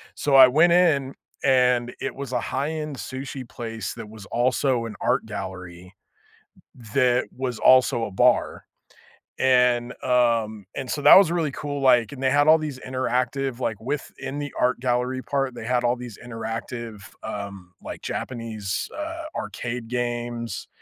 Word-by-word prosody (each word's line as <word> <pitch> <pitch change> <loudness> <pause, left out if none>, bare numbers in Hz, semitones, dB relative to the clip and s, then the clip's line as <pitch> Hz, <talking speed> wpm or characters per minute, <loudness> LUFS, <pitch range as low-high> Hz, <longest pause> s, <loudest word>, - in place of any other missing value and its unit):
so, 140 -2 +1
I 130 -1 +10
went 155 +7 +4
in, 150 -7 +3 0.3
and 125 -2 +3
it - - -3
was 135 -2 -6
a - - +1
high-end 150 +1 -3
sushi 130 0 -6
place 115 -2 -5
that 115 -2 -8
was 110 -2 -11
also 125 0 +1
an 110 -2 -7
art - - +1
gallery, 90 -3 -8 1.0
that 125 -2 +3
was 125 -2 -3
also 125 -2 +5
a 105 - -6
bar, - - +2 0.8
and, 125 -1 +3
um, 115 -5 +1
and, 130 -2 -5
so, 145 - -2
that - - +10
was 190 -4 +5
really 165 -4 0
cool, 145 0 -5
like, 125 -4 +4
and 135 - -9
they 130 - +3
had 145 +1 +3
all 160 +1 +8
these 150 -4 -5
interactive, 130 0 -2
like 110 -5 -2
within 140 +1 -5
the 145 -1 -5
art 125 0 +2
gallery 125 +1 0
part, 135 -3 -1
they 110 - -7
had 125 0 +1
all 120 0 +2
these 120 -4 -9
interactive, 115 -1 -6 0.2
um, 100 -4 -7
like, - - -8
Japanese, 110 -5 -4
uh, 330 +2 -5
arcade 120 -1 -5
games 120 -1 -3
125 Hz, 155 wpm, -24 LUFS, 115-135 Hz, 1.0 s, I